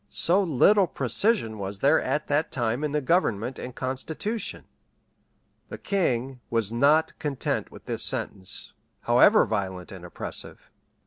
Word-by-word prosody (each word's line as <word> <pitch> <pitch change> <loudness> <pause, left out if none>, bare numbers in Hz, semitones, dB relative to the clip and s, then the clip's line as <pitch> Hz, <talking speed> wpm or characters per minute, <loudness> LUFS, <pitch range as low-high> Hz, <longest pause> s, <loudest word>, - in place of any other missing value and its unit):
So 180 +4 +4
little 190 +4 +4
precision 130 - 0
was 100 0 -4
there 145 +9 +3
at 150 - -1
that 145 +2 0
time 120 +3 -1
in 150 - -1
the 150 0 0
government 130 - 0
and 125 - -7
constitution! 160 - -3 1.0
The - - -7
king 135 - -1
was 115 -3 -1
not 145 +7 +3
content 140 -4 -2
with - - -14
this - - -1
sentence, 95 -1 -1 0.3
however - - +5
violent 95 -4 -4
and 95 -3 -10
oppressive. 90 - -5
130 Hz, 135 wpm, -26 LUFS, 110-160 Hz, 1.0 s, however